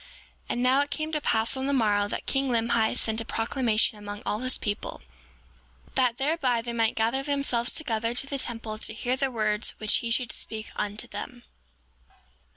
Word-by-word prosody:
7:17 - - -19 0.4
And 245 - 0
now, 260 +2 +5
it 285 - -1
came 310 +1 -3
to 305 -1 0
pass 225 -2 +2
on 265 +1 -2
the 280 - +1
morrow 205 -5 +3
that - - -4
king 270 -1 0
Limhi 230 -2 +2
sent 220 0 +1
a - - -6
proclamation 225 -2 +1
among 205 0 -7
all 210 - 0
his 255 +1 +1
people, 205 0 -4 0.9
that 250 -3 +2
thereby 270 -5 +1
they 235 0 -4
might 225 -1 +2
gather 230 +4 +1
themselves 275 -4 +1
together 230 -5 -1
to 260 - +2
the 275 0 -3
temple 225 -3 -2
to 220 - -3
hear 245 +3 0
the 270 0 0
words 215 -2 0
which 215 -1 +2
he 235 - -3
should 240 0 +1
speak 220 0 -4
unto 210 +1 -2
them. 240 +4 -7
235 Hz, 190 wpm, -27 LUFS, 220-265 Hz, 0.9 s, now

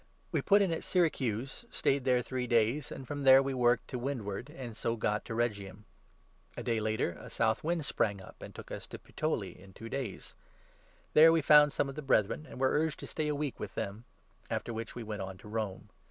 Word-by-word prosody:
We - - +1
put 200 0 +5
in 180 -4 +1
at 160 - -3
Syracuse 135 - 0
and - - -29
stayed 135 -1 +1
there 125 -1 +3
three 125 0 -3
12 - - -13
days, 120 +6 +2
and 130 - -7
from 145 0 -4
there 135 0 +8
we 135 0 -2
worked 120 -1 +2
to 125 - -4
windward 120 -2 -4
and 130 -7 -8
so 115 +1 -1
got 105 -1 -1
to 115 - -5
13 - - -3
Rhegium. 100 -4 -2 0.7
A - - -4
day 115 -2 0
later 110 -4 0
a - - -10
south 110 0 +1
wind 165 -1 -1
sprang 100 -6 0
up 95 - -13
and - - -9
took - - -10
us - - -6
to - - -8
Puteoli - - -3
in 95 +1 -15
two 115 +4 -9
days. 130 -7 -5 0.8
There 160 +1 +8
we 165 -2 +2
found 150 0 +7
some 140 - 0
of 135 - -5
the 150 - -6
Brethren, 135 +1 +1
14 - - -15
and - - -9
were 130 0 +3
urged 155 +1 0
to - - -6
stay 155 -1 -2
a 150 - 0
week 145 -2 -3
with - - -6
them; 105 +4 -4 0.4
after 120 - -3
which 115 0 -5
we 120 - -5
went 105 -2 -5
on 95 0 -6
to 105 - -14
Rome. 105 -3 -4
125 Hz, 240 wpm, -32 LUFS, 110-145 Hz, 0.8 s, there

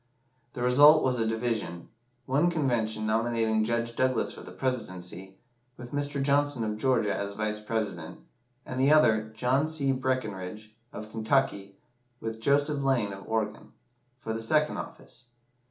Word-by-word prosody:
The 120 - -4
result 145 +5 +7
was 125 -2 +1
a 115 - +1
division 110 -6 -2 0.4
one 145 +6 +2
convention 120 -9 0
nominating 110 0 +1
Judge 115 +1 -1
Douglas 130 0 +1
for - - -10
the - - -10
Presidency, 95 -7 -4 0.4
with 120 0 -10
Mr. 145 0 -2
Johnson, 140 -2 +2
of 105 -1 -2
Georgia, 115 -3 +1
as 100 0 -4
Vice 105 0 -1
President; 105 -7 -4 0.5
and 130 - -5
the 135 +3 +4
other, 110 -8 +4
John 130 +6 +1
C. 150 -4 0
Breckinridge, 110 -6 -3 0.2
of 110 0 -8
Kentucky, 110 -4 0 0.4
with 115 0 -5
Joseph 145 +3 +2
Lane, 120 -7 +1
of 95 0 -10
Oregon, 110 -1 -3 0.4
for 110 -2 -5
the 115 - -3
second 150 +6 +1
office. 125 - -10
115 Hz, 145 wpm, -28 LUFS, 110-135 Hz, 0.5 s, result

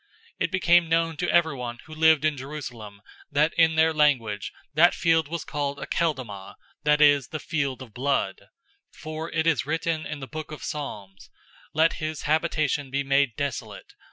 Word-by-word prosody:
001:019 - - -38 0.3
It - - 0
became 175 -3 +4
known 165 0 +1
to 175 +3 -2
everyone 135 -8 +1
who 155 - -11
lived 160 -1 +4
in 155 -1 +2
Jerusalem 120 -7 -8 0.3
that 150 +3 +2
in 160 -1 +4
their 160 0 +4
language 115 -9 +1 0.2
that 165 +4 +5
field 165 -2 +2
was 170 +1 -5
called 145 -1 -3
'Akeldama,' 130 - -3 0.3
that 150 0 +3
is, 145 -2 +5
'The 155 - -5
field 140 -6 -2
of 115 -5 -15
blood.' 130 -6 -1 0.5
001:020 - - -18
For 155 +1 -6
it 160 -1 0
is 165 -3 +1
written 160 0 -1
in 150 - -6
the 135 - -6
book 155 +2 -7
of 150 - -8
Psalms, 100 -10 -6 0.5
'Let 160 +1 +4
his 155 -1 -4
habitation 155 -2 0
be 140 +2 -1
made 140 -3 +2
desolate. 140 -5 -5
150 Hz, 175 wpm, -25 LUFS, 135-160 Hz, 0.5 s, that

